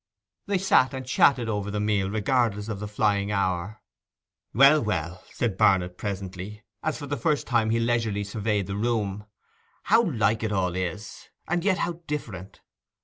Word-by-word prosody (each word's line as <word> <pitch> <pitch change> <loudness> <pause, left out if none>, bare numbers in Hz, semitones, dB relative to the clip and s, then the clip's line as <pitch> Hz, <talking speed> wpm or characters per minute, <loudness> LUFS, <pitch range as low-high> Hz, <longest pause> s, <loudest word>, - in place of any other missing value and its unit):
They 200 -1 +1
sat 145 -8 +3
and 130 0 -6
chatted 125 -1 +3
over 105 -2 -2
the 105 +1 -2
meal, 105 -2 0
regardless 110 -1 0
of 105 -3 -4
the 105 - -5
flying 105 -1 0
hour. 95 0 -2 0.7
'Well, 140 +4 +6
well!' 95 -4 -3
said 110 -6 -2
Barnet 90 -2 +3
presently, 100 +1 -6 0.2
as 155 - -2
for 145 - -7
the 145 +1 -2
first 155 -4 0
time 115 -3 +1
he 115 +1 +1
leisurely 115 -3 0
surveyed 105 -1 -1
the 100 +1 -5
room; 105 -2 -2 0.6
'how 225 +3 +4
like 110 -5 +1
it 110 -1 -2
all 90 -3 0
is, 95 +3 -5 0.2
and 175 0 0
yet 195 -2 +2
how 175 -3 -3
different! 105 - -6
105 Hz, 165 wpm, -26 LUFS, 100-125 Hz, 0.7 s, Well